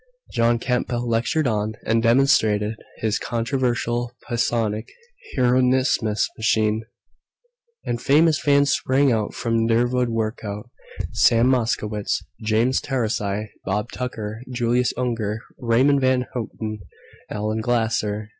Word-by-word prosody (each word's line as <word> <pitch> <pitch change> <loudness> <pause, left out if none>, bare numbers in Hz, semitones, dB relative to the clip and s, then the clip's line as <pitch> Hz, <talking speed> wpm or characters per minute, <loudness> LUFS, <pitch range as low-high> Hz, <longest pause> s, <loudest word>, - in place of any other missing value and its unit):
John 115 0 +3
Campbell 120 0 -1
lectured 120 +7 +1
on 110 -2 0
and 115 +1 +2
demonstrated 115 -4 +3 0.3
his 110 0 0
controversial 120 -1 -1 0.2
psionic 110 -2 0 0.5
Hieronymus 130 +1 +3
machine, 110 0 0 1.0
and 120 0 -2
famous 155 +1 +4
fans 140 -1 +3
sprang 130 -5 +2
from 115 -1 0
der 115 +1 +3
vood 125 0 0
work 115 -1 -2
out 105 +3 -6 0.4
Sam 120 +2 +4
Moskowitz, 110 -4 -1 0.2
James 115 +4 +2
Taurasi, 105 -5 -2
Bob 105 +4 -2
Tucker, 110 -3 -5
Julius 120 0 +1
Unger, 115 -3 -2 0.2
Raymond 130 +3 +3
Van 130 -1 +2
Houten, 110 -2 -5 0.5
Allen 110 +1 -2
Glasser 110 -3 -1
115 Hz, 110 wpm, -22 LUFS, 110-125 Hz, 1.0 s, famous